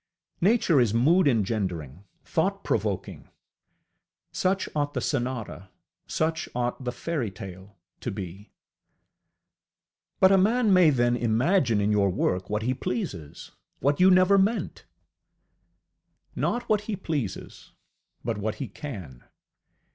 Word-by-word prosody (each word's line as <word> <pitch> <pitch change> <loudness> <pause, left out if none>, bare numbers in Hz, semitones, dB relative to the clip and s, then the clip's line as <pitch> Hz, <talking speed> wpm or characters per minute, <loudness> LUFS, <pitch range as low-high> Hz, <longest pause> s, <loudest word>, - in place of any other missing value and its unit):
Nature 185 - +4
is 115 -2 +1
mood 155 +8 +4
engendering, 95 - -1 0.2
thought - - -1
provoking: - - -2 1.0
such 190 +1 0
ought 145 -1 -1
the - - +1
sonata, 120 - -3 0.4
such 160 +1 -1
ought 125 +1 -2
the 125 - -2
fairytale 100 - -5 0.2
to - - -4
be. 100 -1 -7 1.7
ŌĆ£But 190 - +6
a 195 - +6
man 220 +2 +3
may 180 -3 +6
then 120 -3 +2
imagine 120 - +2
in 105 +1 +1
your 100 -2 +3
work 90 0 -1
what 105 +1 -1
he 125 +3 +1
pleases, 100 - -5 0.3
what 140 +1 +1
you 185 +1 +7
never 185 +2 +5
meant! 210 +4 -1 1.5
ŌĆØ - - -21
Not 240 0 -1
what 215 -2 +2
he 210 - 0
pleases, 150 - -5 0.5
but 115 -2 -2
what 105 +1 -2
he 135 - -5
can. 95 - -8
120 Hz, 125 wpm, -26 LUFS, -, 1.7 s, you